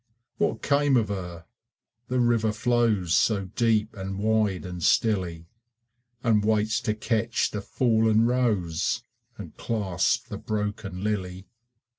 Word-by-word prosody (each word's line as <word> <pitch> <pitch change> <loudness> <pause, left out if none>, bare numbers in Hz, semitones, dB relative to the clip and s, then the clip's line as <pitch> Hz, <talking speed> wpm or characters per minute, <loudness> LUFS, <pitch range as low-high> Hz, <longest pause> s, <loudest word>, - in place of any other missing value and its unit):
What 110 - 0
came 140 -2 +3
of 110 -4 +1
her? 90 -4 -6 0.6
The 130 0 0
river 115 -2 +2
flows 110 -5 +1
So 100 +1 +2
deep 110 -2 +1
and 95 -1 -5
wide 105 -3 +1
and 90 -1 -6
stilly, 90 -4 +1 0.8
And 110 -4 +3
waits 110 +1 +1
to 105 - -1
catch 115 +1 0
the 105 - -4
fallen 110 0 +2
rose 115 -3 0 0.3
And 90 -7 -9
clasp 100 -6 -1
the - - -6
broken 105 -3 -4
lily. 95 -3 -3
105 Hz, 125 wpm, -26 LUFS, 95-115 Hz, 0.8 s, came